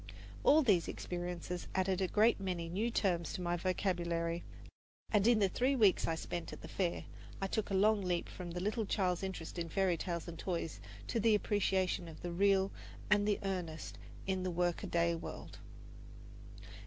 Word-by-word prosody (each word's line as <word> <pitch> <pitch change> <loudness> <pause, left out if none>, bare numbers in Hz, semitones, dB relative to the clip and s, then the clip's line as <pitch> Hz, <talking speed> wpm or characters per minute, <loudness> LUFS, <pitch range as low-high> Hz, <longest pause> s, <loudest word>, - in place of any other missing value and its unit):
All 305 +2 +6
these 190 -9 +3
experiences 175 0 -4
added 190 0 +1
a 190 - +2
great 215 +5 +4
many 180 -4 -3
new 210 +7 0
terms 175 -8 0
to - - -4
my 175 0 +1
vocabulary, 170 -2 -1 0.7
and 210 0 +4
in 240 -1 +6
the 200 -2 +4
three 255 +8 +1
weeks 210 -7 +4
I 165 - +1
spent 170 +1 -4
at - - -9
the - - -8
Fair 180 -3 -1 0.3
I 195 - -1
took 210 +2 -1
a 195 - 0
long 210 +2 +4
leap 180 -2 -1
from 180 -2 -7
the 175 +1 -4
little 210 +3 -1
child's 180 -4 +1
interest 185 -3 -5
in 165 -1 -3
fairy 185 0 +2
tales 170 -2 -3
and 170 -1 -7
toys 170 -4 -3 0.3
to 230 - -1
the 220 0 +5
appreciation 190 -4 +1
of 160 - -11
the 175 - -3
real 195 +2 +3 0.4
and 205 0 +4
the 205 - +2
earnest 180 -5 -4 0.3
in 190 -1 0
the 185 - -1
workaday 170 -1 +1
world. 165 - -7
185 Hz, 180 wpm, -35 LUFS, 170-200 Hz, 0.7 s, All